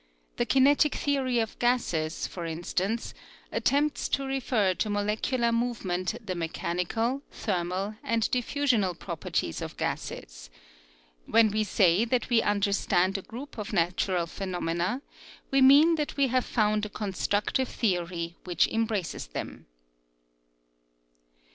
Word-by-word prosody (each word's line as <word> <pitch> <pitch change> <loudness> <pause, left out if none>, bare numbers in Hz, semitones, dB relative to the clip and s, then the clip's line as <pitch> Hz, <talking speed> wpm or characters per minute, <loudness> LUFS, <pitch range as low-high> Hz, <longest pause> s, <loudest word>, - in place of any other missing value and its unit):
The 240 - 0
kinetic 280 +4 +4
theory 270 -4 0
of 225 -1 -2
gases, 175 -11 0
for 175 - -6
instance, 185 +7 -2 0.4
attempts 290 +2 +1
to 275 - 0
refer 250 -7 +1
to 215 - -2
molecular 215 +4 0
movement 215 -7 -1
the 185 - -2
mechan 170 +1 -2
ical 235 +9 -1
thermal, 185 +1 -2
and 230 -1 0
diffusional 245 - +1
properties - - -3
of - - -6
gases. - - -5 0.8
When 225 -2 +5
we 215 +1 +1
say 190 -1 +3
that 245 +1 -1
we 230 -2 +5
understand 200 -2 +1
a 195 - -1
group 245 +5 -9
of 210 0 -5
natural 180 0 +1
phenomena, 180 - -2 0.5
we 270 0 +4
mean 285 +5 +7
that 300 -1 -3
we 275 -2 +3
have 255 0 +1
found 215 -2 +1
a 210 - -2
constructive 205 +5 -1
theory 175 -5 -2
which 175 -2 +2
em 225 0 +1
braces 200 - -3
them. - - -7
210 Hz, 130 wpm, -28 LUFS, 180-245 Hz, 0.8 s, mean